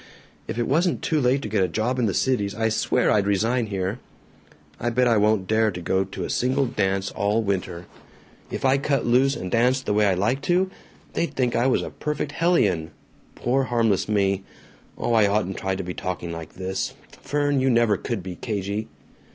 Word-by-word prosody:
If -, -, -4 dB
it 120 Hz, -, 0 dB
wasn't 170 Hz, +5 st, +1 dB
too 155 Hz, -2 st, +1 dB
late 130 Hz, +2 st, +2 dB
to -, -, -3 dB
get 105 Hz, -1 st, 0 dB
a -, -, +2 dB
job 110 Hz, +8 st, -1 dB
in 120 Hz, -, +2 dB
the 100 Hz, -, 0 dB
Cities, 105 Hz, -7 st, 0 dB
I 110 Hz, 0 st, +1 dB
swear 110 Hz, -, +1 dB
I'd 100 Hz, -2 st, +2 dB
resign 110 Hz, +4 st, +1 dB
here. 100 Hz, +3 st, -3 dB, 0.8 s
I 120 Hz, -, 0 dB
bet 125 Hz, +1 st, +2 dB
I 115 Hz, -2 st, +4 dB
won't 105 Hz, -2 st, +2 dB
dare 110 Hz, +2 st, +2 dB
to 90 Hz, -3 st, -5 dB
go 95 Hz, +2 st, +1 dB
to 95 Hz, -, -6 dB
a -, -, -4 dB
single 130 Hz, +2 st, +1 dB
dance 95 Hz, -5 st, -1 dB
all 105 Hz, +3 st, 0 dB
winter. 90 Hz, -3 st, -3 dB, 0.6 s
If -, -, -4 dB
I 135 Hz, +1 st, +4 dB
cut 140 Hz, -2 st, 0 dB
loose 130 Hz, +3 st, +3 dB
and 90 Hz, 0 st, -5 dB
danced 125 Hz, +3 st, +2 dB
the 105 Hz, -, 0 dB
way 105 Hz, 0 st, +3 dB
I 95 Hz, -, +2 dB
like 115 Hz, +9 st, 0 dB
to, 180 Hz, +5 st, +1 dB, 0.4 s
they'd 170 Hz, -, -2 dB
think 125 Hz, -2 st, +1 dB
I 120 Hz, +2 st, +2 dB
was 130 Hz, -, +2 dB
a -, -, -6 dB
perfect 150 Hz, -1 st, -3 dB
hellion 105 Hz, -, +2 dB, 0.5 s
poor 130 Hz, +2 st, +1 dB
harmless 115 Hz, -5 st, +1 dB
me! 100 Hz, -2 st, +1 dB, 0.5 s
Oh, 120 Hz, -, -1 dB
I 110 Hz, -3 st, +5 dB
oughtn't 100 Hz, -2 st, -1 dB
to 95 Hz, 0 st, -2 dB
be 90 Hz, 0 st, -5 dB
talking 90 Hz, -2 st, -4 dB
like 85 Hz, -1 st, -7 dB
this. 95 Hz, +1 st, -3 dB, 0.3 s
Fern, 145 Hz, -2 st, 0 dB
you 135 Hz, -, +2 dB
never 115 Hz, -3 st, +3 dB
could 100 Hz, 0 st, -4 dB
be 90 Hz, -1 st, -6 dB
cagey!" 105 Hz, 0 st, -3 dB
110 Hz, 200 wpm, -24 LUFS, 95-130 Hz, 0.8 s, I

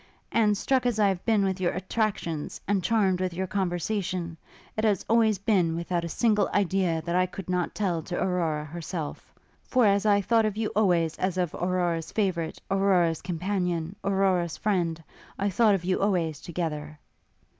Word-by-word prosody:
And, 210 Hz, -3 st, +3 dB
struck 260 Hz, +3 st, +1 dB
as 240 Hz, -3 st, 0 dB
I 205 Hz, -2 st, +4 dB
have 185 Hz, -2 st, -2 dB
been 215 Hz, -3 st, +3 dB
with 190 Hz, -1 st, -2 dB
your 175 Hz, -, +1 dB
attractions, 185 Hz, -5 st, -2 dB
and 195 Hz, -2 st, +1 dB
charmed 195 Hz, -5 st, +2 dB
with 185 Hz, -2 st, -2 dB
your 190 Hz, +2 st, -1 dB
conversation, 180 Hz, -2 st, -2 dB, 0.4 s
it 215 Hz, -, -2 dB
has 210 Hz, -4 st, +1 dB
always 220 Hz, -2 st, +3 dB
been 185 Hz, -5 st, +1 dB
without 170 Hz, 0 st, -2 dB
a 170 Hz, -, -4 dB
single 215 Hz, +3 st, +2 dB
idea 185 Hz, -4 st, +1 dB
that 170 Hz, 0 st, -2 dB
I 185 Hz, 0 st, +3 dB
could 190 Hz, +1 st, -8 dB
not 180 Hz, -1 st, -1 dB
tell 180 Hz, -6 st, 0 dB
to 175 Hz, +3 st, -5 dB
Aurora 165 Hz, -5 st, 0 dB
herself; 160 Hz, 0 st, -6 dB, 0.4 s
for 250 Hz, -3 st, +3 dB
as 200 Hz, -1 st, +3 dB
I 205 Hz, -1 st, +5 dB
thought 225 Hz, +2 st, +2 dB
of 210 Hz, -1 st, -4 dB
you 220 Hz, -1 st, 0 dB
always 175 Hz, -6 st, +2 dB
as 185 Hz, -1 st, -1 dB
of 175 Hz, -4 st, 0 dB
Aurora's 175 Hz, -2 st, -1 dB
favourite, 185 Hz, -6 st, -1 dB
Aurora's 185 Hz, -4 st, +2 dB
companion, 180 Hz, -1 st, -2 dB
Aurora's 190 Hz, -4 st, +1 dB
friend, 170 Hz, -6 st, -1 dB, 0.3 s
I 200 Hz, +1 st, 0 dB
thought 215 Hz, +1 st, +4 dB
of 175 Hz, -2 st, -4 dB
you 185 Hz, 0 st, +1 dB
always 175 Hz, -7 st, 0 dB
together.' 155 Hz, -3 st, -4 dB
185 Hz, 175 wpm, -27 LUFS, 170-205 Hz, 0.4 s, I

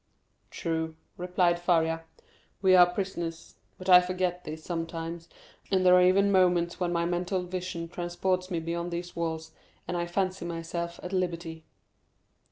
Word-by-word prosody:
"True," 160 Hz, -1 st, -3 dB, 0.2 s
replied 180 Hz, -1 st, +1 dB
Faria, 165 Hz, -2 st, +1 dB, 0.5 s
"we 190 Hz, -2 st, +5 dB
are 175 Hz, -1 st, +7 dB
prisoners; 170 Hz, -3 st, -4 dB, 0.2 s
but 185 Hz, -, -9 dB
I 180 Hz, -1 st, +9 dB
forget 180 Hz, 0 st, -2 dB
this 155 Hz, +1 st, -7 dB
sometimes, 165 Hz, 0 st, -5 dB, 0.4 s
and 185 Hz, -1 st, +2 dB
there 180 Hz, -, +7 dB
are 180 Hz, -, +7 dB
even 195 Hz, +2 st, +4 dB
moments 180 Hz, -2 st, +3 dB
when 175 Hz, -1 st, 0 dB
my 170 Hz, -1 st, +1 dB
mental 180 Hz, +2 st, -1 dB
vision 180 Hz, -2 st, -4 dB
transports 180 Hz, +2 st, -2 dB
me 175 Hz, -3 st, -1 dB
beyond 170 Hz, +1 st, -3 dB
these 175 Hz, 0 st, -5 dB
walls, 160 Hz, -1 st, -3 dB, 0.4 s
and 180 Hz, -, -2 dB
I 175 Hz, 0 st, -1 dB
fancy 185 Hz, +1 st, -1 dB
myself 170 Hz, 0 st, -4 dB
at 180 Hz, -, -6 dB
liberty." 170 Hz, -3 st, -2 dB
175 Hz, 150 wpm, -28 LUFS, 170-180 Hz, 0.5 s, I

